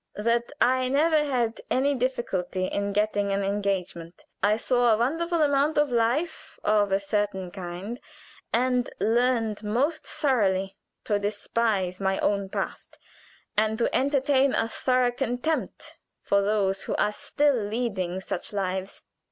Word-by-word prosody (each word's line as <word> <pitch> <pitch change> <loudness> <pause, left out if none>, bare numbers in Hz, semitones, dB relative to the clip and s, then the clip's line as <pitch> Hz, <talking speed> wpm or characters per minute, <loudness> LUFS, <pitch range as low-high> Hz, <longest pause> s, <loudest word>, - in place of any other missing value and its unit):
"That 235 +2 0
I 255 +1 +3
never 305 +3 +3
had 245 -6 -1
any 275 +3 +2
difficulty 235 -8 -2
in 200 +2 -2
getting 205 0 0
an 195 0 0
engagement. 195 -4 -3 0.2
I 210 +1 +3
saw 245 0 +2
a 215 - +4
wonderful 325 +7 +1
amount 285 +1 +2
of 295 -2 +3
life 285 +8 -1
of 205 -1 +2
a 195 - +3
certain 200 -2 -2
kind, 190 +6 -6 0.5
and 250 +1 +1
learned 225 -2 +1
most 260 +10 0
thoroughly 195 -10 +1 0.3
to 205 -2 0
despise 205 -2 -1
my 190 -1 0
own 200 -1 0
past, - - -5 0.6
and 215 +1 +1
to 235 - 0
entertain 275 0 +2
a 225 - +1
thorough 250 +1 +1
contempt 245 +6 -3 0.2
for 200 0 +2
those 195 -1 +1
who - - -2
are 210 - +1
still 290 +6 +1
leading 205 -5 -2
such - - -4
lives. 190 -1 -3
220 Hz, 135 wpm, -26 LUFS, 200-255 Hz, 0.6 s, a